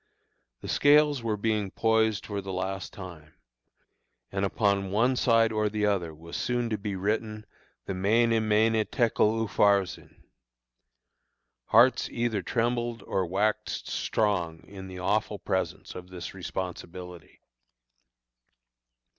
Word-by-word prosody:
The - - -7
scales 145 -1 +4
were 110 -2 -1
being 105 -1 0
poised 110 0 +1
for 100 -2 -4
the 95 0 -6
last 95 +1 -3
time, 85 -6 -11 1.0
and 95 0 -2
upon 100 0 +1
the - - -6
one 115 +6 +2
side 115 -2 +3
or 110 -1 +1
the 105 0 -1
other 95 -5 0
was 80 +2 -10
soon 120 -1 -1
to 110 - 0
be 100 -1 -4
written 110 +2 -2 0.4
the - - -3
"Mene, 110 +4 +2
Mene, 110 +1 +3
Tekel, 115 -1 +2
Upharsin." 100 -2 +1 1.4
Hearts 120 +3 +4
either 115 -4 -1
trembled 120 +2 -1
or 95 -2 -1
waxed 105 +4 -1
strong 90 -7 -1
in 95 -1 -10
the 95 -1 -9
awful 90 - 0
presence - - -3
of 90 0 -9
this 90 -2 -7
responsibility. 90 -2 -7
105 Hz, 125 wpm, -28 LUFS, 95-115 Hz, 1.4 s, scales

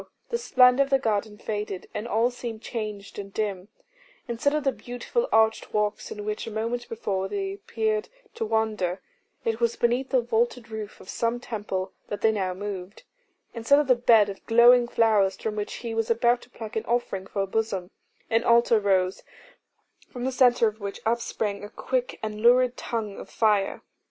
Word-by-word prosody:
the 470 - +1
splendour 250 - +5
of 275 - -7
the 270 - +4
garden 215 -4 -1
faded, 210 -3 -4
and 220 - -4
all 235 +2 +2
seemed 240 -2 -6
changed 210 -4 -6
and 200 -1 -7
dim; 200 -3 -2 0.6
instead 235 +4 0
of 300 0 0
the 270 - +2
beautiful 250 - -3
arched 220 0 +2
walks, 210 0 0
in 210 0 -6
which 215 +1 -3
a - - -5
moment 230 +3 -3
before 195 -4 -2
they 390 - -3
appeared 430 +1 -2 0.2
to 460 - -3
wander, 215 - 0 0.5
it 225 0 0
was 235 -1 +1
beneath 245 +3 +1
the 260 - +3
vaulted 235 0 0
roof 215 -1 -6
of - - -14
some 230 +3 -1
temple 200 -5 -4
that 205 - -5
they 220 - +4
now 190 -4 -1
moved; 195 - -6 0.5
instead 235 +4 +3
of 295 - +3
the 255 - +5
bed 235 -4 +5
of 195 -1 -8
glowing 240 +1 +6
flowers 215 -5 +3
from 215 -1 -3
which 210 -1 -4
he 230 - -3
was 225 0 -1
about 235 +1 +3
to - - -16
pluck 225 -3 -8
an 220 - -1
offering 230 -5 -1
for 200 - -2
her - - +1
bosom, 195 -3 -2 0.4
an 225 0 +2
altar 235 -1 +4
rose, 190 -2 +1 0.9
from 250 -1 -5
the 260 - 0
centre 245 -3 +4
of 215 +1 -4
which 200 -1 -5
upsprang 220 -3 -1
a 205 - -7
quick 255 +3 -2
and 215 0 -4
lurid 250 +1 +5
tongue 220 -4 -4
of - - -10
fire. 210 -3 +1
225 Hz, 185 wpm, -26 LUFS, 205-245 Hz, 0.9 s, glowing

